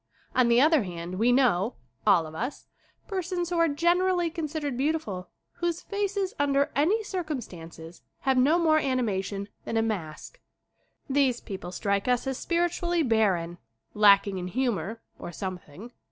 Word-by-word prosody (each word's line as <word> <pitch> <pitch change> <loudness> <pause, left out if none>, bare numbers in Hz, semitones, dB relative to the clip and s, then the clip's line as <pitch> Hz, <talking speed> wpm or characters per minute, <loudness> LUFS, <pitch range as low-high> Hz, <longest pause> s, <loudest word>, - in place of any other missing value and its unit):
On 255 -2 +4
the 235 0 +5
other 305 +1 +5
hand 175 -1 -6
we 235 +3 +4
know, 240 -4 +2 0.3
all 165 -2 +5
of 155 - -9
us, 245 - -5 0.4
persons 360 -2 -3
who 345 - +1
are 335 - +5
generally 345 +3 +2
considered 305 -4 -3
beautiful 260 -10 -2 0.3
whose 345 -1 -2
faces, 400 -1 -2
under 280 0 +2
any 375 +11 +2
circum 345 -8 -3
stances, 165 -4 -11 0.2
have 265 -1 +2
no 275 +6 +4
more 315 -2 +4
animation 205 -7 -1 0.2
than 225 - -2
a 225 - +3
mask 200 - -5 0.7
These 270 -3 +2
people 185 -3 -7
strike 200 +2 -1
us 250 0 +1
as 265 -1 -3
spiritually 345 0 0
barren, 190 - +1 0.3
lacking 200 -2 +5
in 180 - -4
humor, 225 -1 -2 0.2
or - - -7
something. 185 +3 -7
255 Hz, 150 wpm, -27 LUFS, 195-325 Hz, 0.7 s, the